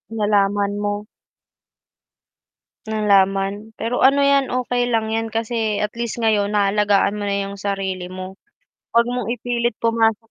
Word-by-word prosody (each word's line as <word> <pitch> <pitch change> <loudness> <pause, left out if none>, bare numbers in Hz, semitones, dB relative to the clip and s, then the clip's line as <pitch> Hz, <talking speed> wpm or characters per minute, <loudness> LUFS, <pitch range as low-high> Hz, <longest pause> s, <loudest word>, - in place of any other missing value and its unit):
Nalaman 205 -1 +1
mo. 205 +1 -3 1.8
Nalaman, 205 0 +1
pero 245 +3 +1
ano 280 +1 +5
yan, 280 -2 +3
okey 245 -1 0
lang 220 -1 +1
yan 225 0 -1
kasi 225 -2 -1
at 210 0 -1
least 235 0 -3
ngayon 210 -2 +1
naalagaan 205 0 +2
mo 205 - -4
na 200 0 0
yung 200 - -8
sarili 195 -2 -3
mo. 185 +1 -8 0.6
Huwag 235 0 +5
mong 245 -3 -3
ipilit 240 -1 -1
pumasok 225 -1 +1
215 Hz, 135 wpm, -21 LUFS, 200-235 Hz, 1.8 s, ano